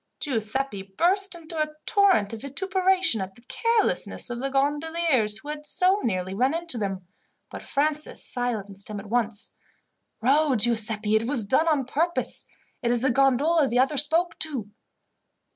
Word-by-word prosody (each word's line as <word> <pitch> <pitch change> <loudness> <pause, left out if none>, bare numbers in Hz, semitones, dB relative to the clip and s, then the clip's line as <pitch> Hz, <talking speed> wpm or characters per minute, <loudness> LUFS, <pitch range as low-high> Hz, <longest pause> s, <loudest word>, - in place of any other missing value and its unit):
Giuseppi 245 -3 -2
burst 350 - +1
into 325 -1 -7
a 305 0 -3
torrent 380 - +3
of 225 - -7
vituperation 375 - +2
at 190 0 -6
the 235 - -18
carelessness 460 - 0
of 240 - -4
the 270 +2 -2
gondoliers 290 -4 +1
who 290 +7 -11
had 300 0 -6
so 365 +6 +2
nearly 185 -4 -2
run 255 +9 +1
into 335 -8 -3
them, 195 -3 -4 0.5
but - - -8
Francis 300 +1 -2
silenced 210 -6 -3
him 210 -1 -5
at 200 +1 -11
once. 230 -2 -1 0.7
"Row, 280 +3 +3
Giuseppi. 220 -1 +2
It 220 +1 +1
was 255 -4 +1
done 265 +10 +2
on 295 -5 +1
purpose. 330 +7 -2 0.4
It 240 - -1
is 240 0 +1
the 265 - +3
gondola 275 +4 +3
the 245 - -1
other 270 +3 +2
spoke 330 +5 +2
to." 260 -10 -2
270 Hz, 160 wpm, -25 LUFS, 220-320 Hz, 0.7 s, torrent